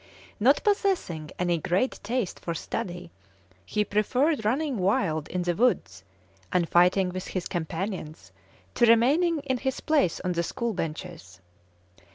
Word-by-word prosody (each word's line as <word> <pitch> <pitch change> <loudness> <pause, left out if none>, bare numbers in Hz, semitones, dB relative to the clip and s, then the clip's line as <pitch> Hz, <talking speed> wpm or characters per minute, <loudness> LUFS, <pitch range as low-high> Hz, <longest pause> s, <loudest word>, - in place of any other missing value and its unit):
Not 265 +7 +4
possessing 380 - 0
any 175 -2 +1
great 185 - 0
taste 230 -2 -2
for 170 - -4
study, 175 0 -5 0.5
he 210 - -1
preferred 250 +7 +1
running 260 +3 0
wild 180 -5 +1
in 180 0 -2
the 175 0 0
woods, 245 +8 0 0.5
and 180 -3 +2
fighting 180 +2 +4
with 185 0 -5
his 185 -2 -3
companions, 170 -1 -5 0.4
to 240 - +4
remaining 290 +9 +4
in 260 -3 -2
his 265 0 -2
place 290 - +1
on 180 - -1
the 170 -1 0
school 235 +6 -2
benches. 160 - -6
195 Hz, 140 wpm, -27 LUFS, 175-255 Hz, 0.5 s, Not